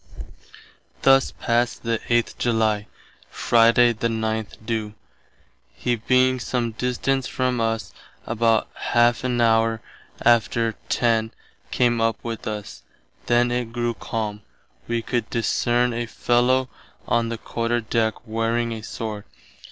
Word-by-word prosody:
Thus 135 0 +5
past 120 0 -1
the 115 -1 0
8th 120 -1 +1
July. 110 -3 +1 0.4
Friday 120 +1 +4
the 115 +1 -1
9th 110 -2 -2
do., 110 -2 -3 0.8
he 120 -1 0
being 130 +3 +2
some 120 -1 -2
distance 125 +3 -1
from 125 -2 -1
us, 115 0 -2 0.3
About 115 0 +2 0.3
½ 120 +1 +4
an 125 -1 0
hour 115 -1 +3 0.5
after 115 -1 +3 0.2
10 115 -2 +2 0.4
came 120 -2 +2
up 115 0 +1
with 115 -1 -5
us. 105 -1 -6 0.5
Then 120 0 +3
it 120 -2 -2
grew 120 0 -1
calme. 105 -1 -4 0.5
Wee 115 -1 -1
could 120 -2 -2
discerne 120 +1 +1
a 120 0 -3
fellow 125 +3 +2 0.4
on 115 -1 +1
the 115 - -3
Quarter 120 +1 -2
Deck 110 -1 0
wearing 115 +1 -1
a 110 -1 -5
sword. 110 -1 -6
115 Hz, 125 wpm, -23 LUFS, 115-120 Hz, 0.8 s, Thus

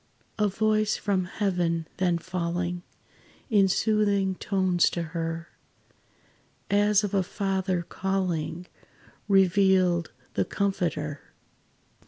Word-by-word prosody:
A 210 - +3
voice 215 +1 +1
from 190 -3 0
heaven 175 -4 -1
then 180 -2 +2
falling 175 0 -3 0.7
In 200 -3 +5
soothing 200 -1 +2
tones 185 -2 +1
to 170 - -3
her, 165 0 -3 1.2
As 205 0 +4
of 205 - -3
a 195 - +3
Father, 190 -1 -1
calling, 180 -3 -2 0.6
Revealed 190 -3 +3 0.2
the - - +1
Comforter. 165 -7 -2
185 Hz, 95 wpm, -27 LUFS, 175-200 Hz, 1.2 s, In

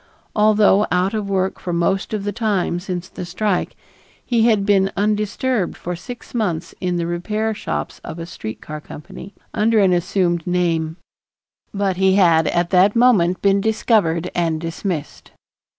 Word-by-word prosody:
Although 210 -1 +4
out 180 +3 +1
of 210 -2 -2
work 190 -1 0
for 180 - -4
most 175 +3 0
of 210 -2 -2
the 205 - -2
time 200 -5 -1
since 180 -1 -5
the 185 - -8
strike, 180 +2 -1 0.5
he 235 -2 +2
had 210 -4 +2
been 195 -1 +3
undisturbed 210 +1 0
for 180 +1 -4
six 245 +7 -10
months 175 -8 -2
in 180 -2 -1
the 170 - -1
repair 210 +6 -2
shops 210 - -5
of - - -7
a 165 - -5
street 110 -9 -7
car 150 0 -7
company, 175 +6 -11 0.2
under 220 +2 +2
an 195 -3 +4
assumed 175 -1 0
name, 165 -2 0 0.7
but 195 -2 -1
he 190 0 +3
had 165 -5 +4
at 175 0 0
that 190 +3 +4
moment 210 -8 +3
been 200 0 +3
discovered 200 -6 +1
and 165 -2 0
dismissed. 165 -1 -5
190 Hz, 160 wpm, -20 LUFS, 175-210 Hz, 0.7 s, Although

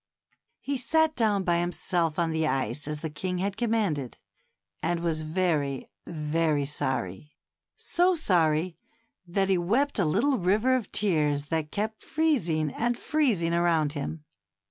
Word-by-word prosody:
He 280 0 -2
sat 315 +5 +2
down 210 -5 +2
by 175 -1 +2
himself 175 -2 0
on 170 -2 +1
the 160 0 0
ice 135 +1 -1
as 150 -1 -4
the 160 - -3
king 180 +4 -3
had 195 +2 -1
commanded, 210 - -1 0.6
and 170 +1 -1
was 165 -2 -1
very, 155 -5 -1 0.2
very 155 -2 0
sorry 130 -3 -3 0.2
— - - -64
so 360 +1 +2
sorry 170 - +1 0.5
that 195 +2 +1
he 190 -2 +3
wept 235 +10 +1
a 190 - +3
little 240 - +2
river 210 +8 +3
of 250 -4 -3
tears 150 -7 +1
that 160 -2 -1
kept 215 +1 -3
freezing 175 - 0
and 240 +1 0
freezing 225 - +1
around 165 -4 +2
him. 150 +1 -5
170 Hz, 145 wpm, -27 LUFS, 155-215 Hz, 0.6 s, he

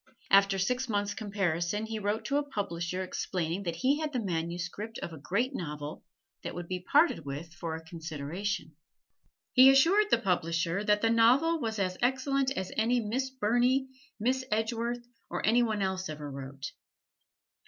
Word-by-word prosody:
After 195 0 +5
six 250 +7 0
months' 205 -1 0
comparison 200 -1 -1
he 220 0 -4
wrote 205 +2 -1
to 280 - +1
a - - +3
publisher 185 -5 -2
explaining 180 -1 -2
that 170 -4 -3
he 270 - +2
had 310 -1 -2
the 250 - 0
manuscript 175 +3 -3
of 170 - -6
a 160 - -9
great 215 - 0
novel 150 - -5 0.4
that - - -6
would 175 -1 -5
be 185 0 -3
parted 295 - +4
with 145 +4 -6
for 165 -2 -4
a 160 - -8
consideration. 160 +2 -4 0.8
He 260 +1 +9
assured 350 +11 +5
the - - +5
publisher 170 0 0
that 210 -1 +3
the 225 - +4
novel 260 +9 +4
was 220 -2 -2
as 185 -2 -1
excellent 265 +2 +1
as 185 - -3
any 235 +3 +2
Miss 245 +4 -1
Burney, 255 +2 +2 0.3
Miss 255 +4 +1
Edgeworth, 235 +2 -1 0.2
or - - -2
any 235 +3 +5
one 215 -4 0
else 190 -2 -2
ever 150 -1 -6
wrote. 135 +1 -7
205 Hz, 165 wpm, -30 LUFS, 170-245 Hz, 0.8 s, He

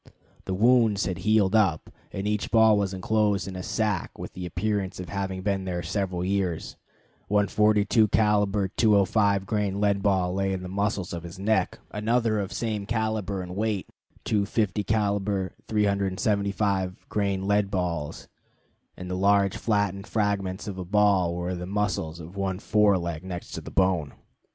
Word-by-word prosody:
The 95 - -2
wounds 115 -1 +4
had 90 - -3
healed 110 -2 +3
up, 95 -8 +2 0.2
and 100 +1 -3
each 105 -1 -1
ball 110 -1 +5
was 100 -2 0
inclosed 100 -1 0
in 95 - -6
a 90 - -4
sac 105 -1 -2
with - - -7
the 90 -1 -5
appearance 95 +1 -2
of 90 - -6
having 95 -2 -3
been 100 -1 0
there 90 -2 -3
several 90 +1 -2
years: 95 -4 -1 0.5
one 105 0 +2
42 105 +1 +3
caliber 105 -2 +2
205 100 -1 +3
grain 100 -2 -1
lead 100 -1 +2
ball 95 -3 +1
lay 95 0 0
in 95 -1 -4
the - - -5
muscles 100 -1 -1
of 85 - -4
the 85 +2 -10
neck, 110 +3 +1
another 110 +1 +1
of 100 -1 -3
same 105 -2 -3
caliber 110 -4 -1
and 90 0 -7
weight, 105 -2 -1 0.3
two 105 -2 +1
50 105 -2 0
caliber 100 -3 0
375 100 -1 0
grain 100 -2 -1
lead 100 -1 +2
balls, 85 -6 -3 0.7
and 90 - -7
the 90 - -4
large 100 0 +3
flattened 100 -2 -1
fragment 100 -2 -1
of 95 -2 -5
a - - -3
ball 95 -2 +2
were 90 +1 -3
in 90 - -4
the 90 - -5
muscles 95 -5 -2
of 85 +3 -10
one 95 -2 -2
fore 105 -1 +3
leg 85 -2 -4
next 90 -2 -7
to - - -5
the - - -9
bone. 90 -6 +1
100 Hz, 170 wpm, -26 LUFS, 95-105 Hz, 0.7 s, ball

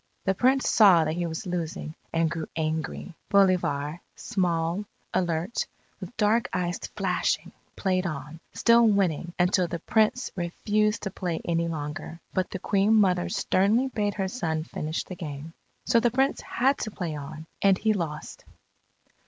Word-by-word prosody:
The 195 - +3
Prince 260 +6 +2
saw 190 -7 +6
that 155 - -1
he 175 +1 -1
was 160 +5 -5
losing, 170 -3 -4 0.2
and 165 0 +2
grew 165 -1 -4
angry. 160 +2 -3 0.2
Bolivar, 175 -6 +2
small, 175 0 -1 0.3
alert, 175 +3 0 0.3
with 245 - -9
dark 225 +2 +2
eyes 175 0 -1 0.2
flashing, - - 0 0.2
played 185 -1 0
on, 150 0 -6
still 235 0 +5
winning 180 -5 +1
until 180 0 +3
the 170 - -3
Prince 220 +8 +1
refused 210 +4 0
to 195 - -3
play 175 -3 -3
any 170 0 +1
longer. 155 +1 -5
But 185 -1 0
the - - -4
Queen 200 +3 +2
mother 180 -4 +3
sternly 210 +9 +2
bade 205 -4 -1
her 195 -2 -1
son 160 -7 -2
finish 155 -1 -3
the - - -8
game. 155 -1 -7 0.3
So 235 -1 +4
the 240 +1 +3
Prince 265 +4 +1
had 265 +3 +1
to 215 - -2
play 175 -7 -4
on, 155 +2 -7 0.2
and 195 -1 +5
he 220 +2 +2
lost. 160 -6 -5
180 Hz, 155 wpm, -27 LUFS, 165-210 Hz, 0.3 s, saw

